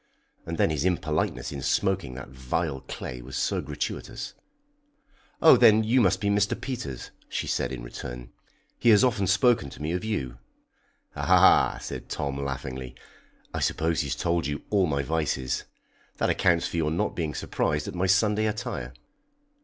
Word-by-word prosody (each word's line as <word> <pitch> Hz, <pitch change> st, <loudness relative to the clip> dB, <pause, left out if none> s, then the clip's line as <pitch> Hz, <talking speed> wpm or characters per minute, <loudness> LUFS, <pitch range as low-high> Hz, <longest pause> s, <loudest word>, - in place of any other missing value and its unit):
And 85 Hz, 0 st, -3 dB
then -, -, +3 dB
his 75 Hz, -2 st, -1 dB
impoliteness 75 Hz, -8 st, -1 dB
in 70 Hz, -2 st, -5 dB
smoking 65 Hz, -1 st, 0 dB
that 65 Hz, 0 st, -8 dB
vile 65 Hz, +3 st, -2 dB
clay 60 Hz, -1 st, -6 dB
was 65 Hz, +2 st, -7 dB
so -, -, 0 dB
gratuitous. -, -, -5 dB, 1.1 s
"Oh, 160 Hz, -, +9 dB
then 110 Hz, -2 st, +6 dB
you 120 Hz, +4 st, +3 dB
must 95 Hz, -3 st, +3 dB
be 100 Hz, 0 st, 0 dB
Mr. 100 Hz, 0 st, +1 dB
Peters," 75 Hz, -, -5 dB, 0.2 s
she -, -, -2 dB
said -, -, -1 dB
in 60 Hz, -2 st, -6 dB
return. -, -, -8 dB, 0.5 s
"He 120 Hz, -, +4 dB
has 105 Hz, 0 st, +7 dB
often 110 Hz, -7 st, +2 dB
spoken 100 Hz, -, +3 dB
to -, -, -12 dB
me 75 Hz, +2 st, -2 dB
of 90 Hz, +3 st, -2 dB
you." 65 Hz, -, -3 dB, 0.8 s
"Ah!" -, -, +5 dB
said -, -, -7 dB
Tom 70 Hz, -1 st, -3 dB
laughingly, 65 Hz, -2 st, -5 dB, 0.6 s
"I -, -, -2 dB
suppose 80 Hz, 0 st, 0 dB
he's 70 Hz, -3 st, -2 dB
told 85 Hz, -3 st, 0 dB
you 75 Hz, 0 st, -4 dB
all 100 Hz, -3 st, +3 dB
my 70 Hz, -2 st, 0 dB
vices. 75 Hz, -4 st, -1 dB, 0.5 s
That -, -, +2 dB
accounts 85 Hz, -2 st, +2 dB
for -, -, -5 dB
your 80 Hz, -2 st, +1 dB
not 80 Hz, +2 st, -1 dB
being 80 Hz, -5 st, -2 dB
surprised 75 Hz, +2 st, -1 dB
at -, -, -5 dB
my 90 Hz, +1 st, 0 dB
Sunday 105 Hz, +3 st, +3 dB
attire." 65 Hz, -, -4 dB
80 Hz, 165 wpm, -27 LUFS, 65-100 Hz, 1.1 s, Oh